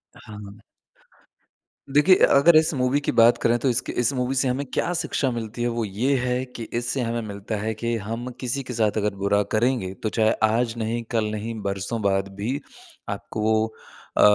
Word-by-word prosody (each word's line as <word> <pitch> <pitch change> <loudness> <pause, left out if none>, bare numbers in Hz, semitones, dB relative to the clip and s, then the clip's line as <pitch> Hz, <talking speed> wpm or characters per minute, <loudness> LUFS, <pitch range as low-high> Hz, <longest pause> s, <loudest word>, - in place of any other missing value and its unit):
हाँ। 105 -1 -11 1.3
देखिए 150 +7 +6
अ, - - +5
अगर 155 +4 +6
इस 155 0 +4
मूवी 130 +1 +1
की 145 - -1
बात 115 +1 +5
करें 120 +1 +3
तो 135 - +1
इसके 120 -1 -1
इस 120 +3 +2
मूवी 130 +1 -1
से 130 +1 +2
हमें 130 +3 -1
क्या 175 - 0
शिक्षा 145 -5 -1
मिलती 115 0 -5
है, 120 - +1
वो 115 -2 -1
ये 115 +8 0
है 125 +1 -1
कि 125 -2 -8 0.2
इससे 120 +2 -2
हमें 115 0 -1
मिलता 100 +2 -5
है 110 +2 -2
कि 115 +2 -2
हम 115 +4 -5
किसी 130 +2 -2
के 125 -1 -6
साथ 110 -2 +1
अगर 105 -1 0
बुरा 100 +1 +1
करेंगे 110 -4 +1
तो 110 - +1
चाहे 110 0 +2
आज 115 +1 +2
नहीं 115 +1 -2
कल 115 -2 +1
नहीं 110 +2 -4
बरसों 100 +3 -3
बाद 95 -1 +1
भी 120 +8 -2 0.5
आपको 110 - -5
वो 110 0 +2 0.5
अ, - - +4
115 Hz, 195 wpm, -24 LUFS, 110-125 Hz, 1.3 s, देखिए